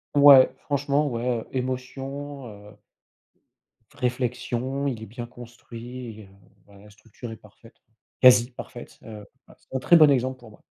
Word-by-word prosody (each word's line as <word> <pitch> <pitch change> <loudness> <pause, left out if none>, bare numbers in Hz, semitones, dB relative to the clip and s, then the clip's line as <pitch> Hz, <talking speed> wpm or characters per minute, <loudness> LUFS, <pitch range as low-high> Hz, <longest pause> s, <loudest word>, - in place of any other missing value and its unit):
ouais, 140 -2 +8
franchement 145 +1 0
ouais, 120 -2 -2
émotion 135 +2 -5
heu 105 -1 -13 1.2
v - - -23
réflexion, 125 +1 -2
il 115 -5 -4
est - - -6
bien 120 +3 -8
construit, 120 -1 -10
heu, - - -16 0.4
bah, 100 -1 -19
la 105 +2 -16
structure 110 +3 -12
est - - -7
parfaite 110 +2 -19
quoi, 110 - -42 0.3
quasi 120 -1 +6
parfaite, 120 0 -11
heu, 105 -2 -10 0.2
bah, - - -18
c'est - - -14
un - - +1
très 170 +6 +5
bon 155 -2 +7
exemple 130 -1 0
pour 120 -3 -14
moi. 105 - -20
125 Hz, 160 wpm, -25 LUFS, 115-135 Hz, 1.2 s, ouais